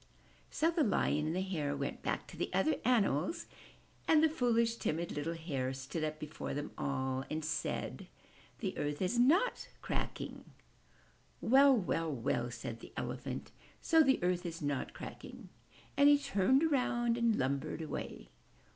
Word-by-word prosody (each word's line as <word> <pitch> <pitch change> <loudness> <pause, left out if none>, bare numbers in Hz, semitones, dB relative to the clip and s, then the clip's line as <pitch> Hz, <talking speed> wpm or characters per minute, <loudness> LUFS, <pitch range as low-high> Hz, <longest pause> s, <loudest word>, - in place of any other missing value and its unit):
So 325 +2 +2
the 330 -2 +2
Lion 150 - +1
and 160 - -1
the 185 - 0
Hare 155 -7 -2
went 140 - -3
back - - -2
to - - -10
the - - -3
other 310 - +3
animals 200 - +2 0.6
and 315 -1 +5
the - - +7
fooHsh, 235 -5 +1
timid, 165 +2 -1
little 155 +3 -3
Hare 140 -6 -2
stood 135 +5 -4
up 155 0 -2
before 155 -2 -5
them 145 +1 -4
all 130 -1 -1
and 155 0 -3
said, 155 0 -3 0.5
*The - - -2
earth 145 0 -2
is 190 +6 +1
not 335 - +3 0.2
cracking/* - - -4 0.9
"Well! 270 +1 +6
Well! 165 -5 -1
Well!" 120 -2 -1
said 115 -1 -6
the - - -12
Elephant. - - -4 0.3
''So 325 -1 +6
the 265 -2 +4
earth 180 0 +1
is 165 -1 -5
not 145 -3 -2
cracking!'' - - -9 0.5
And 285 +1 +6
he 290 - +7
turned 260 +2 +2
around 240 -6 +2
and 235 -2 +2
lumbered 140 +3 -1
away. 155 - -6
175 Hz, 155 wpm, -34 LUFS, -, 0.9 s, the